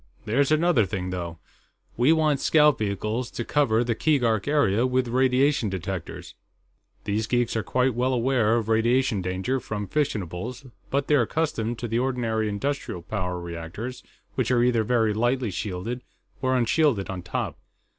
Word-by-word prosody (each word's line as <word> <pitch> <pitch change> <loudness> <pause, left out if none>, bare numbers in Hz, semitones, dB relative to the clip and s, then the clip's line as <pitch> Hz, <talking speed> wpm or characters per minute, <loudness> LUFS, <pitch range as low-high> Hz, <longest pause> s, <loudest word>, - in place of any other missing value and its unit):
"There's 135 +7 +2
another 155 - +3
thing, 90 -3 -3
though. 85 -2 -4 0.6
We 125 +6 +4
want 155 -3 +3
scout 150 -1 +4
vehicles 105 +4 -2
to 120 - -5
cover 120 -6 +2
the 120 -1 0
Keegark 115 -5 +1
area 125 -7 +2
with 130 0 +1
radiation 130 0 +2
detectors. 95 -2 -5 0.7
These 110 +2 -1
geeks 120 -1 0
are 110 - +1
quite 125 +3 +1
well 125 +3 0
aware 120 -3 +2
of 110 -2 -2
radiation 115 0 +2
danger 95 +9 -1
from 105 -3 -4
fissionables, 120 - -3 0.2
but 140 0 0
they're 145 -3 +4
accustomed 120 -4 -1
to 120 - -4
the 115 +1 0
ordinary 115 -4 0
industrial 105 -5 -3
power 90 -2 -3
reactors, 85 +8 -6 0.3
which - - -1
are 120 -1 +3
either 120 -2 +3
very 110 -2 +2
lightly 120 +1 0
shielded 100 +6 -4 0.4
or 130 -1 +2
unshielded 125 -3 +2
on 95 -1 -5
top. 90 - -4
120 Hz, 155 wpm, -25 LUFS, 105-130 Hz, 0.7 s, We